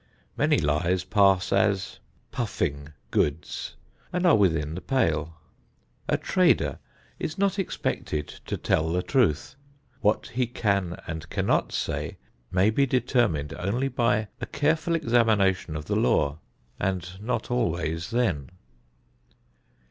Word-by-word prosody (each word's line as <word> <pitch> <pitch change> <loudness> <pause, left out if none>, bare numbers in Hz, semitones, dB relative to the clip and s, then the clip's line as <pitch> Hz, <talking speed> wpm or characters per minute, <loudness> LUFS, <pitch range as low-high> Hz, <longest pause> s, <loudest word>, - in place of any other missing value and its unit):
Many - - +3
lies 85 +5 +1
pass 95 -1 +3
as 100 -1 +1 0.3
"puffing 70 +1 -2 0.2
goods" 75 +2 -1 0.4
and 180 +1 0
are 175 - +7
within 80 -7 +2
the 90 - -5
pale. 80 - 0 0.7
A - - +3
trader - - +2 0.4
is 155 - -3
not 200 0 +1
expected 75 - -2 0.2
to - - -2
tell 80 +1 +1
the 90 +2 0
truth. 120 - +1 0.4
What 105 -4 +1
he 125 +1 0
can 100 -7 0
and 80 -1 -6
cannot - - +1
say - - -3 0.3
may 95 +4 +3
be 140 +5 +2
determined 120 - +1
only 115 +9 0
by 110 -5 +1
a - - -3
careful 160 +3 +1
examination 110 - +2
of 75 0 -5
the - - -1
law, 70 +4 +2 0.4
and 95 -2 -1
not 120 +1 -2
always 85 -8 -1
then. 110 - 0
100 Hz, 125 wpm, -26 LUFS, 80-120 Hz, 0.7 s, are